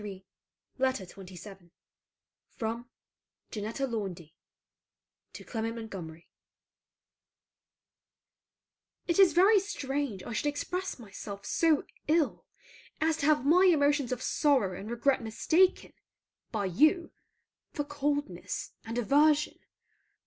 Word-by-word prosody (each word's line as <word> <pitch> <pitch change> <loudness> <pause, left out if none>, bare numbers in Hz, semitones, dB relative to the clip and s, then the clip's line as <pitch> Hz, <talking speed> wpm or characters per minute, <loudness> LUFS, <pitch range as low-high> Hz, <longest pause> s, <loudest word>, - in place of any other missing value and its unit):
CLEMENT 195 -2 -8 0.5
MONTGOMERY 260 -8 0
LETTER 195 - -12
XXVII 180 -1 -12 0.9
FROM 230 +2 -4 0.6
JANETTA 220 +5 -3
LAUNDY 190 - -5 1.0
TO - - -10
CLEMENT 225 -1 -3
MONTGOMERY 180 -8 -8 2.8
It 340 +1 0
is 385 -3 +7
very 395 +4 +6
strange 275 - -3
I 240 - -6
should 260 - -1
express 360 +6 -3
myself 200 -3 -9
so 320 -3 +2 0.2
ill 310 -1 +1 0.5
as 320 0 +1
to 285 - 0
have 300 -4 +3
my 355 +6 +6
emotions 285 -4 +2
of 250 - -3
sorrow 260 -11 +2
and 200 +4 -7
regret 255 +3 +1
mistaken, 315 +12 +2 0.6
by 210 -3 -1
you, 310 - +3 0.6
for 290 - -2
coldness 290 -10 -3
and 230 +1 -5
aversion. 295 +5 +3
260 Hz, 105 wpm, -30 LUFS, 210-300 Hz, 2.8 s, is